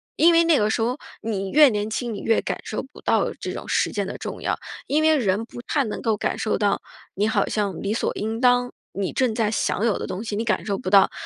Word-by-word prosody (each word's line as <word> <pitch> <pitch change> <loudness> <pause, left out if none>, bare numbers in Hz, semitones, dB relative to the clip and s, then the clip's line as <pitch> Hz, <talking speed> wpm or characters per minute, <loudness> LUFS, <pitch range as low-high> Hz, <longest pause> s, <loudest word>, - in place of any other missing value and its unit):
因 335 +1 +5
为 335 0 +6
那 330 -3 +5
个 210 -2 +2
时 225 - 0
候 245 +4 0 0.2
你 195 -3 -3
越 300 -1 +7
年 210 -2 -2
轻， 235 +1 -3
你 205 - -5
越 225 - +2
感 - - -3
受 215 - -3
不 265 - -14
到 - - +1
这 - - -4
种 - - -7
时 - - +1
间 - - -2
的 - - -5
重 - - -6
要， - - -1 0.3
因 305 +2 +2
为 315 0 +5
人 210 -3 0
不 240 - -10
太 280 +3 0
能 215 - -4
够 220 -2 +1
感 - - -2
受 215 - 0
到 200 -1 +1 0.3
你 205 +3 +1
好 210 -3 +1
像 200 -5 -2
理 200 +2 0
所 - - 0
应 220 +2 -3
当 245 -1 +3 0.2
你 195 -1 -2
正 255 -5 +1
在 220 -2 +1
享 220 0 0
有 225 - +1
的 - - -4
东 190 +4 -4
西， 220 -3 -4
你 220 - -1
感 215 -2 0
受 200 -2 -1
不 185 - -3
到。 195 0 +6
220 Hz, 285 characters per minute, -23 LUFS, 205-245 Hz, 0.3 s, 越